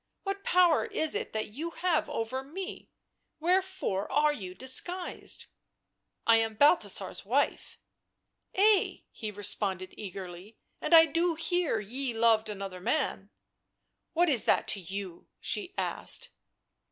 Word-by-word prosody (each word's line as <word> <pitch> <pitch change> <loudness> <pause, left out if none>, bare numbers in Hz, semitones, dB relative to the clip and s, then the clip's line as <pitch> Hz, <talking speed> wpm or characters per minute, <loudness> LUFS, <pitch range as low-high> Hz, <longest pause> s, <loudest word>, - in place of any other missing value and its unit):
What 395 0 -3
power 355 -3 +4
is 315 - 0
it 430 +1 -2
that 215 -1 -3
you 315 +7 -4
have 345 -1 0
over 230 +4 -2
me? 365 +7 -7 0.5
Wherefore 365 - 0
are 295 +2 +3
you 185 -8 -7
disguised 350 - 0 0.2
?" - - -54
" - - -52
I 230 0 +6
am 225 -1 0
Balthasar's 290 +9 +2
wife." - - 0 0.4
" - - -34
Ay," 410 0 +3
he 215 - -6
responded 200 -2 -3
eagerly; 185 -2 -8
<c 220 - -20 0.3
and 335 - +4
I 325 0 +10
do 335 +2 +1
hear 330 -5 0
ye 240 +4 -4
loved 225 -1 +3
another 195 -3 -6
man 205 -5 -1 0.3
" - - -53
" - - -52
What 345 +2 +3
is 265 -8 +2
that - - +3
to 200 - 0
you?" 190 -1 -7
she 395 -2 -2
asked. - - -2
260 Hz, 150 wpm, -30 LUFS, 205-345 Hz, 0.5 s, I